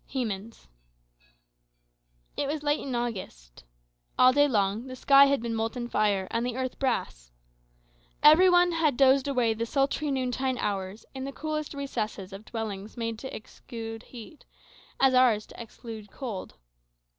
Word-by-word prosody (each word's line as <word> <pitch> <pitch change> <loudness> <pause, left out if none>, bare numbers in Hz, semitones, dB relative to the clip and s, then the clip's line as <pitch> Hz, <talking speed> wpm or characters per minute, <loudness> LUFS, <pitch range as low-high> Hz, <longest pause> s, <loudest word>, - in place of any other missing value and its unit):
Hemans 225 - -4 1.7
It 280 - -1
was 300 +1 -3
late 295 0 +1
in 265 -3 -4
August. 185 - -5 0.5
All 255 0 +6
day 290 +1 +5
long 210 0 0
the 255 - -7
sky 275 +2 +6
had 275 -4 +1
been 235 -1 -2
molten 225 +2 -2
fire, 205 -4 +1
and 230 +1 0
the 245 0 -3
earth 260 -1 -3
brass. - - -2 0.9
Every 315 +5 +8
one 355 0 +5
had 315 -6 +1
dozed 270 0 +4
away 250 -5 +1
the 230 +1 -3
sultry 280 +3 0
noontide 260 -1 -1
hours 200 -1 -3
in 265 -1 -6
the 275 - -4
coolest 305 +1 -4
recesses 215 -8 -4
of 200 +2 -10
dwellings 215 -2 -6
made 230 -1 -3
to 265 - -7
exclude 225 0 -8
heat, 245 +5 -12 0.6
as 270 -1 +4
ours 245 -5 +4
to - - -11
exclude 225 -2 -10
cold. 215 - -7
240 Hz, 150 wpm, -27 LUFS, 215-275 Hz, 1.7 s, Every